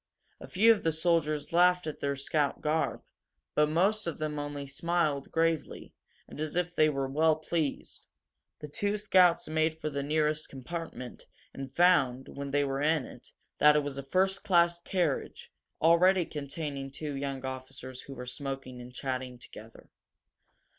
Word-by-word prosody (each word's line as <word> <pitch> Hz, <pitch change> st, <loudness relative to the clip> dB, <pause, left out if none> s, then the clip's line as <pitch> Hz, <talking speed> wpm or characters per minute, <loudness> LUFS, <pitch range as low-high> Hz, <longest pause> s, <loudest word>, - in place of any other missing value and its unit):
A -, -, -10 dB
few 220 Hz, +5 st, +5 dB
of 220 Hz, -, +2 dB
the 165 Hz, -, +1 dB
soldiers 160 Hz, -2 st, +1 dB
laughed 180 Hz, 0 st, +4 dB
at 155 Hz, -, -5 dB
their 140 Hz, 0 st, -1 dB
scout 140 Hz, +1 st, 0 dB
garb, 155 Hz, +1 st, -1 dB, 0.5 s
but 150 Hz, 0 st, +3 dB
most 195 Hz, +6 st, +1 dB
of 170 Hz, -, -3 dB
them 150 Hz, -1 st, -3 dB
only 145 Hz, -1 st, -5 dB
smiled 150 Hz, 0 st, -1 dB
gravely, 165 Hz, -1 st, -1 dB, 0.3 s
and -, -, -8 dB
as 155 Hz, 0 st, -3 dB
if 175 Hz, 0 st, 0 dB
they 155 Hz, -2 st, +4 dB
were 135 Hz, -2 st, -1 dB
well 155 Hz, +3 st, +3 dB
pleased. 155 Hz, -2 st, -3 dB, 0.5 s
The 150 Hz, -, -6 dB
two 205 Hz, +8 st, -1 dB
scouts 185 Hz, -4 st, +4 dB
made 160 Hz, +1 st, 0 dB
for 155 Hz, -, -3 dB
the 140 Hz, 0 st, -2 dB
nearest 155 Hz, +1 st, 0 dB
compartment, 135 Hz, -2 st, -7 dB, 0.3 s
and 135 Hz, -1 st, -7 dB
found, 140 Hz, -8 st, +3 dB
when 140 Hz, 0 st, -6 dB
they 145 Hz, +1 st, +2 dB
were 135 Hz, 0 st, -2 dB
in 155 Hz, -2 st, +2 dB
it, -, -, -14 dB, 0.3 s
that 150 Hz, +1 st, +7 dB
it 150 Hz, -, +3 dB
was 140 Hz, -1 st, -4 dB
a -, -, -5 dB
first 190 Hz, +7 st, +1 dB
class 170 Hz, -2 st, +3 dB
carriage, 170 Hz, -6 st, -2 dB, 0.3 s
already 175 Hz, +2 st, +5 dB
containing 140 Hz, -2 st, -5 dB
two 145 Hz, +2 st, -6 dB
young 135 Hz, -1 st, -4 dB
officers 130 Hz, -1 st, -7 dB
who 135 Hz, -, -10 dB
were 125 Hz, 0 st, -7 dB
smoking 130 Hz, -1 st, -5 dB
and 125 Hz, +1 st, -10 dB
chatting 130 Hz, -1 st, -4 dB
together. 115 Hz, -2 st, -13 dB
150 Hz, 165 wpm, -30 LUFS, 135-170 Hz, 0.5 s, that